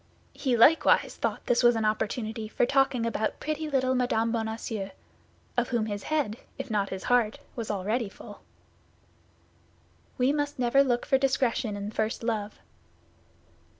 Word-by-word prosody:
He 270 -3 0
likewise 290 +8 +5
thought - - -3
this 240 - +2
was 240 -1 +5
an 220 -1 0
opportunity 220 +1 -2
for 225 - +1
talking 270 -3 +2
about 220 -2 -2
pretty 310 0 -3
little 260 -2 +1
Mme. 235 -3 +1
Bonacieux, 220 -3 -3 0.7
of 245 0 0
whom 235 -3 0
his 205 -2 -4
head, 285 -7 -1 0.2
if 250 - -6
not 205 -2 0
his 190 - -6
heart, 245 -1 +2 0.2
was 230 -4 -5
already 210 +3 -1
full. - - -12 1.8
We 255 +3 +3
must 290 0 -2
never 255 +2 +4
look 245 -3 0
for 265 - +3
discretion 255 -5 0
in 205 +1 -5
first 220 +1 -2
love. 215 -3 -2
235 Hz, 150 wpm, -28 LUFS, 215-260 Hz, 1.8 s, likewise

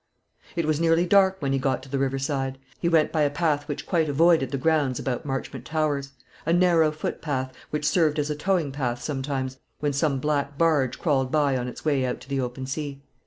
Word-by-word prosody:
It 170 -2 0
was 155 0 +1
nearly 165 +1 +3
dark 190 0 +4
when 135 -1 +1
he 135 - +1
got 130 -1 0
to 135 - -12
the 135 0 -1
river 135 0 0
side. 135 -1 -2 0.2
He 170 - +1
went 160 -2 +3
by 155 - +1
a 145 - +4
path 145 -1 0
which 145 -2 -4
quite 165 -4 +1
avoided 160 -2 +4
the 140 - -2
grounds 145 -3 +1
about 130 +1 -3
Marchmont 135 -1 -4
Towers, 145 -3 -1 0.3
a 165 - 0
narrow 170 -2 +4
footpath, 140 -3 -3 0.2
which 150 0 -1
served 155 -2 +2
as 150 0 0
a - - -1
towing 165 -1 0
path 125 -3 -2
sometimes, 135 -2 -3 0.2
when 145 -1 0
some 140 0 +1
black 145 0 -1
barge 150 -6 +2
crawled 135 -5 +1
by 145 -3 +2
on 125 -1 -2
its 125 - -8
way 140 -4 +2
out 125 -1 -2
to 130 - -14
the 135 -1 0
open 125 +1 -4
sea. 140 0 -5
145 Hz, 215 wpm, -25 LUFS, 135-155 Hz, 0.3 s, dark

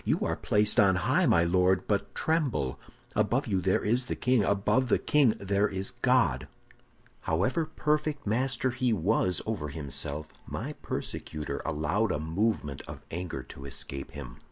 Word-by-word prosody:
You - - 0
are - - 0
placed 105 +3 +2
on 95 -2 +5
high, 130 - +2
my 85 - +4
Lord, 90 +2 +2
but 100 -1 -1
tremble! 135 - 0 0.4
Above 110 +6 +1
you 95 -4 0
there 95 +1 +1
is 120 +4 +2
the - - -2
king; 125 -4 +2
above 105 +6 +2
the - - +3
king 140 -7 +3
there 100 +1 +1
is 95 0 -2
God!' 115 - +2 0.8
"However 110 - +1
perfect 150 -1 -1
master 125 +3 0
he 125 -1 +1
was 95 -1 +1
over 100 -9 -3
himself, 75 0 -3 0.2
my - - -4
persecutor 75 -1 -4
allowed 80 +8 0
a - - 0
movement 80 -2 -1
of - - -9
anger 85 +1 -4
to 70 - -11
escape 70 0 -3
him. 65 -5 -8
100 Hz, 155 wpm, -29 LUFS, 80-125 Hz, 0.8 s, on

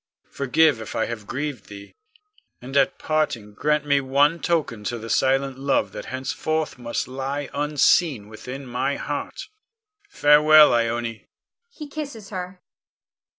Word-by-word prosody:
Forgive 140 -1 +2
if 110 - -8
I 110 - +1
have 110 -3 -7
grieved 140 -3 -4
thee, 100 -1 -11 0.7
and 130 +3 -9
at 140 -1 +3
parting 135 -9 -1
grant 150 +6 0
me 140 -1 +2
one 140 +5 +2
token 155 -12 -1
to 120 - -2
the 115 0 -6
silent 135 +1 +1
love 140 +1 0
that - - -8
henceforth 140 +3 -3
must 120 -1 -3
lie 135 +2 -4
unseen 145 - +2
within 125 +5 -8
my 125 +3 -1
heart. 145 0 -5 0.6
Farewell, 150 - +6
Ione! 115 -1 -1 0.5
[_He 300 -2 -8
kisses 275 -9 -7
her. 180 -1 -7
140 Hz, 135 wpm, -23 LUFS, 120-155 Hz, 0.7 s, Farewell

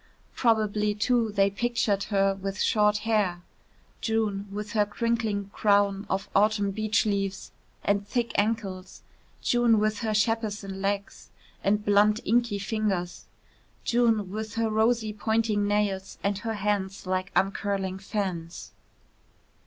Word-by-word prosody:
Probably, 210 -3 +1
too, 225 +1 +1
they 200 -1 +2
pictured 210 -2 0
her 195 -1 +2
with 195 0 -5
short 210 -1 +3
hair, 200 -6 +1 0.6
June, 215 -3 -1
with 210 +1 -5
her 210 -1 +3
crinkling 215 -2 -1
crown 200 -1 +2
of 195 +1 -1
autumn 205 0 +3
beach 215 +2 +1
leaves; 195 -2 -2 0.3
and 200 0 0
thick 240 0 -1
ankles, 200 -3 -2 0.4
June 240 -2 +3
with 215 0 +1
her 220 -2 -1
Shepperson 210 -3 -1
legs; 200 0 -3 0.3
and 210 +1 +1
blunt 210 +1 +4
inky 235 -1 +2
fingers, 195 -4 -2 0.6
June 225 -5 +2
with 215 +1 -5
her 225 -1 0
rosy 220 0 +1
pointing 215 -1 0
nails 205 -2 -1
and 200 0 0
her 225 0 -3
hands 200 -1 -2
like 185 +1 -2
uncurling 195 -1 0
fans. 190 -5 -4
205 Hz, 125 wpm, -27 LUFS, 195-220 Hz, 0.6 s, blunt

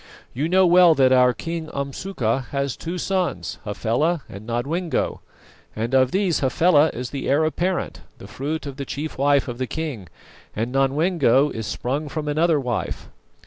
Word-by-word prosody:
You 145 +6 -1
know 190 +1 +5
well 175 -1 +6
that 130 -2 +4
our 125 -1 +5
King 165 +4 -5
Umsuka 140 - -2
has 140 -2 -2
two 170 +2 -5
sons, 180 - -2
Hafela 125 +10 0
and 100 +3 -10
Nodwengo; 150 +9 -1 0.6
and 115 +4 -3
of 130 -1 +4
these 190 -1 +1
Hafela 150 +3 +4
is 125 0 -6
the 140 - -4
heir 145 +3 +3
apparent, 180 +4 -2 0.2
the - - -12
fruit 145 +10 -4
of 140 -2 -7
the 140 - -4
chief 150 +3 -5
wife 140 0 +3
of 120 -1 -6
the 130 - -1
king, 140 - -5 0.5
and 115 +3 -2
Nodwengo 140 0 +2
is 110 -1 -5
sprung 145 +5 -3
from 155 -2 -4
another 155 +1 +2
wife. 125 -4 -3
140 Hz, 165 wpm, -22 LUFS, 125-165 Hz, 0.6 s, well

